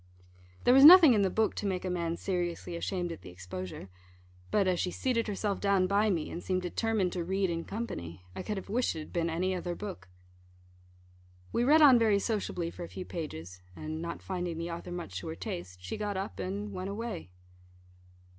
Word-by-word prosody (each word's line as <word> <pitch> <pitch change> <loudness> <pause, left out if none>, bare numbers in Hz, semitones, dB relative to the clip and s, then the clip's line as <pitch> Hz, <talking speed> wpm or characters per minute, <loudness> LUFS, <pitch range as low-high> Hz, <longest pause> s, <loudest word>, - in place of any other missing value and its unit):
There 245 - +6
was 270 +1 +8
nothing 325 -3 +11
in 210 - +3
the 195 - +3
book 220 +3 +1
to 205 - -3
make 185 -1 -2
a - - -1
man 170 -1 -1
seriously 175 -2 -3
ashamed 175 0 -2
at 165 - -8
the - - -10
exposure; 90 +1 -7 0.6
but 200 -2 +2
as 180 -2 +1
she 180 - 0
seated 230 +3 -1
herself 205 -1 -1
down 200 -2 +3
by 200 +3 +2
me, 170 -6 -1
and 170 - -5
seemed 185 -1 -1
determined 195 0 0
to 175 - -2
read 190 +1 0
in 165 0 -3
company, 90 - -6
I - - -4
could 210 -2 -3
have 195 - -6
wished 235 +1 0
it 160 - -4
had 155 - -11
been 170 -1 0
any 180 +3 0
other 175 -1 -3
book. 195 - -7 1.4
We 235 - +2
read 305 +5 +6
on 260 -5 +8
very 220 -3 +4
sociably 200 -5 -2
for 175 - -8
a 170 - -7
few 185 - -7
pages; 90 - -7
and, 155 - -5
not 170 0 -5
finding 180 -3 -3
the 170 +1 -4
author 170 +1 -6
much 170 - -5
to 90 - -8
her 80 - -4
taste, 90 +1 -6
she 95 - -4
got 205 -2 -2
up, 195 +2 -5
and 205 +2 -4
went 185 +1 -4
away. 200 - -5
185 Hz, 210 wpm, -30 LUFS, 165-205 Hz, 1.4 s, nothing